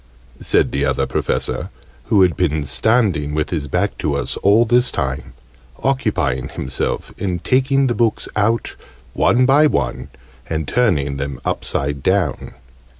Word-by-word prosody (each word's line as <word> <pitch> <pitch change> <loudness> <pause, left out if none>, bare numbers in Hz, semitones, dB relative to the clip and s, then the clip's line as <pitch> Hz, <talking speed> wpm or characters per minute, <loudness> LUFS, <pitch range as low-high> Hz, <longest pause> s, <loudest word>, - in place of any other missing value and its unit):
said - - +2
the - - -1
Other - - +1
Professor, - - -2 0.4
who 100 -4 +4
had 90 -4 +2
been 80 -4 0
standing 85 - +1
with 75 -1 -1
his 75 -5 -2
back - - -1
to 75 -2 -1
us 70 - -1
all 105 +4 +4
this 120 +2 +3
time, 65 -1 -3 0.5
occupying 95 - 0
himself 65 - -3
in 90 -3 -1
taking 135 - +2
the 120 - +1
books 115 -2 0
out, 110 +2 0 0.4
one 125 +2 +3
by 145 +4 +5
one, - - -2 0.4
and 80 -3 -2
turning 70 - +1
them 70 -2 -4
upside 70 0 -2
down. 95 -5 0
90 Hz, 145 wpm, -19 LUFS, 70-120 Hz, 0.5 s, by